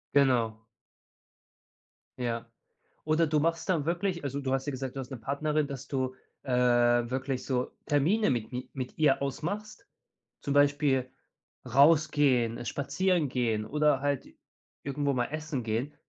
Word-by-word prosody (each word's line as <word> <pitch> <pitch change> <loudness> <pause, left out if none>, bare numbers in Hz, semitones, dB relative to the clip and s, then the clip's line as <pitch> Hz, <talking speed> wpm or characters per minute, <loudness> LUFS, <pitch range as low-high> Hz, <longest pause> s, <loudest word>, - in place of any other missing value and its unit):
Genau. 125 -5 +3 1.6
Ja. 115 -2 -3 0.5
Oder 155 +1 +2
du 150 0 +2
machst 165 +4 -1
dann 160 -5 +1
wirklich 175 0 -1
also, 140 0 -3
du 130 -1 -1
hast 135 0 -1
ja 145 - 0
gesagt, 130 0 -5
du - - -4
hast 130 +1 -7
'ne 130 - -5
Partnerin, 145 +5 -1
dass 140 -3 -7
du, 130 -2 -2 0.3
äh, 130 - -4
wirklich 125 +1 +2
so 125 -2 -1
Termine 160 +10 +2
mit 120 -4 -1
mi 125 0 -5
mit 130 -2 -6
ihr 145 -3 +3
ausmachst. 205 - -4 0.5
Zum 140 - -2
Beispiel 145 -2 +3 0.6
rausgehen, 140 -3 +3
spazieren 175 +4 0
gehen 115 -4 0
oder 150 +1 +2
halt 140 -1 -1 0.6
irgendwo 140 0 -1
mal 125 -1 +1
essen 155 -4 -4
gehen, 120 +7 -2
140 Hz, 140 wpm, -29 LUFS, 125-150 Hz, 1.6 s, Genau